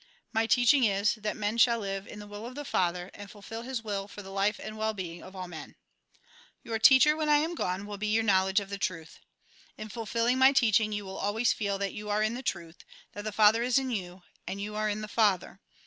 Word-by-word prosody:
My 225 0 +1
teaching 250 +3 +4
is, 200 -1 +2
that 215 -2 -4
man 210 +2 -2
shall 235 0 +5
live 195 -2 -4
in - - -10
the 210 - -9
will 205 +2 -8
of 255 - -10
the 290 0 -6
Father, 180 -2 -1
and 205 0 -10
fulfil 220 +3 -8
His 245 -1 -5
will 200 -2 -3
for 205 0 -10
the 195 - -10
life 200 +2 0
and 215 0 -7
well 220 0 -2
being 175 -3 -6
of 190 - -12
all 185 -1 -6
men. 160 -3 -10 0.4
" - - -28
Your 225 -1 -3
teacher, 265 +5 +7
when 310 -1 -1
I 295 - +6
am 320 +4 0
gone, 190 - -3
will 205 -1 -7
be 215 - -2
your 220 +1 +2
knowledge 190 -1 +3
of 200 -1 -9
the 200 - -4
truth. 165 -4 -4 0.6
In 215 - -7
fulfilling 230 +3 -1
my 265 +1 +7
teaching, 220 -4 +3
you 205 -1 -4
will 190 0 -7
always 220 +4 +1
feel 200 -2 -2
that 200 0 -3
you 210 0 -7
are 210 +1 +1
in 215 +1 0
the 250 - -5
truth, 170 -8 -5 0.3
that 205 0 -8
the 215 - -2
Father 215 +2 +5
is 245 +1 +2
in 265 -1 0
you, 180 -4 -5 0.2
and 195 - -4
you 210 +1 -5
are 215 0 -1
in 210 +1 -3
the 215 - -5
Father. 200 -3 +1
210 Hz, 250 wpm, -29 LUFS, 195-230 Hz, 0.6 s, teacher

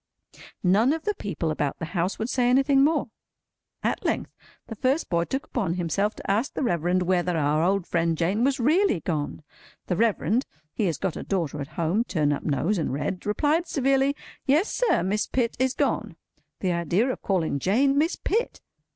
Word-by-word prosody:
None 210 +9 +4
of 320 0 -4
the 420 - 0
people 170 - -3
about 145 -2 -2
the 165 - -4
house 180 +1 0
would 220 - -2
say 250 -1 +1
anything 270 +2 +4
more. 295 -5 +1 0.7
At - - -1
length, - - -1 0.3
the 225 - -7
first 260 +8 0
boy 170 0 +2
took 270 +7 -3
upon 195 -9 -2
himself 185 +5 0
to - - -3
ask 225 +8 0
the - - -1
Reverend 180 -4 +1
whether 180 -1 +1
our 150 0 +2
old 190 +1 +1
friend 165 -2 0
Jane 190 +8 +1
was 270 0 +1
really 300 - +3
gone? 150 -2 -3 0.4
The 180 - -1
Reverend 225 - +1 0.3
(he 215 - 0
has 165 -6 0
got 190 0 -2
a - - -5
daughter 165 -6 -2
at 140 - -5
home—turn 165 -3 +1
up 140 - -3
nose, 160 +7 0
and 160 - -1
red) 165 +8 -3
replied 305 +10 +1
severely, 275 0 +2 0.3
"Yes, 305 +9 +3
sir, - - +2
Miss 205 +3 0
Pitt 240 -3 0
is 260 0 +1
gone." - - -1 0.5
The 185 - +1
idea 170 - +1
of - - -6
calling 165 -7 0
Jane, 260 - +2
Miss 315 +5 +2
Pitt! 460 +4 -1
200 Hz, 185 wpm, -25 LUFS, 170-265 Hz, 0.7 s, None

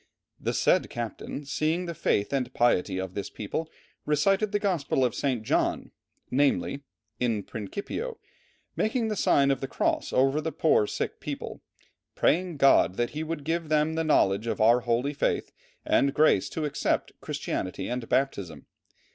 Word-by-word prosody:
"The - - -2
said - - +3
captain, 120 +4 -5
seeing 160 +5 0
the 170 - -4
faith 105 -6 0
and 130 -2 -1
piety 100 -5 +2
of 95 -1 -4
this 100 0 -4
people, 155 +10 -4 0.3
recited 195 +8 +2
the 205 - +2
Gospel 170 -10 +1
of 120 - 0
St. 130 -6 -1
John, - - 0 0.4
namely: 140 +1 +1 0.4
In 115 -4 0
principio, 200 - -5 0.6
making 225 +1 0
the 215 - -1
sign 140 -7 +3
of 135 - -1
the 135 - -2
cross - - -1
over 135 +3 +2
the 160 - -3
poor 145 -8 +3
sick - - -3
people, - - -6 0.5
praying 175 -1 +1
GOD 135 -9 +5
that 120 +2 -1
he 155 - -4
would 160 -2 -4
give 165 +1 -2
them 155 +1 +2
the 165 0 0
knowledge 110 -8 +2
of 115 - -2
our 115 +3 +5
holy 125 +4 0
faith - - -1 0.3
and 140 0 +2
grace 150 -11 +4
to 160 - -3
accept 145 - -1
Christianity 90 - -3
and 125 -1 -4
baptism. 100 -11 -1
140 Hz, 160 wpm, -27 LUFS, 120-160 Hz, 0.6 s, GOD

